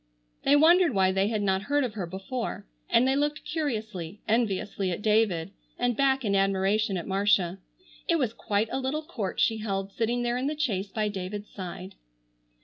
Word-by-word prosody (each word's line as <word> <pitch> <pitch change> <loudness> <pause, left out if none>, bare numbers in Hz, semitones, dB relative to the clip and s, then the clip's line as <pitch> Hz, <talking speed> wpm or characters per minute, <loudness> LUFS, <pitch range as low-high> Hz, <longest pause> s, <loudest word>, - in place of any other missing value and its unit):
They 285 - +4
wondered 330 - +5
why 190 -1 +4
they 195 +1 +1
had 215 -1 -1
not 190 -1 +1
heard 290 0 +3
of 245 -4 -2
her 195 -5 -4
before, 195 +7 -5 0.2
and 250 +2 +4
they 265 - +2
looked 295 +1 -1
curiously, 215 - -3
enviously 205 -3 0
at 180 +3 -4
David, 210 -5 +2 0.3
and 245 -1 +1
back 270 -1 +2
in 200 -1 +1
admiration 195 +1 +2
at 170 - -4
Marcia. 195 -2 +2 0.5
It 335 - +3
was 250 -7 0
quite 215 -1 -1
a - - -1
little 270 +4 -2
court 215 -10 -4
she 225 - +3
held 195 -2 -3
sitting 235 +3 -1
there 240 0 0
in 260 +2 -1
the 300 +1 -2
chaise 210 -10 -1
by 215 +1 -1
David's 205 +1 -6
side. 185 0 -7
215 Hz, 185 wpm, -27 LUFS, 195-255 Hz, 0.5 s, wondered